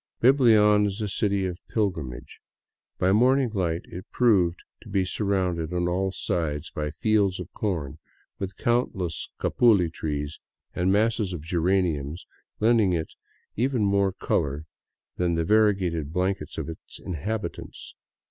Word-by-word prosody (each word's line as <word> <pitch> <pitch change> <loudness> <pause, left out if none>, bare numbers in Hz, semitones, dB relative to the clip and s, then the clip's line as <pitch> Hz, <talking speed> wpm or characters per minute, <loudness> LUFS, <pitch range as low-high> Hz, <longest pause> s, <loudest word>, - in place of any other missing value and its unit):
Biblian 110 -5 +5
is 100 +1 -4
a 105 - -2
city 100 0 0
of 90 -1 -4
pilgrimage. 85 - -3 0.6
By 95 - +2
morning 125 +4 +3
light 90 -5 -1
it 95 +4 -10
proved 95 -8 +3 0.2
to - - -13
be 95 -1 +1
surrounded 90 -5 -1
on 90 -1 0
all 95 +2 0
sides 80 -4 -2
by 75 0 -3
fields 100 +3 +1
of 90 +1 -7
corn, 85 -10 -3 0.4
with 95 -2 -5
countless 95 -9 -1
capuli 100 -9 +3
trees 75 -2 -4 0.3
and 90 +1 +1
masses 105 -2 +1
of 80 -4 -6
geraniums 85 -3 0 0.3
lending 110 -4 +3
it 80 -2 -3 0.4
even 125 -1 +1
more 100 -1 +2
color 75 -4 -1 0.5
than 85 -1 +1
the 85 - +1
varie 105 +1 +4
gated 85 -6 -3
blankets 95 +3 -2
of - - -3
its 80 - -9
inhabitants. 100 +5 -5
95 Hz, 140 wpm, -26 LUFS, 85-105 Hz, 0.6 s, Biblian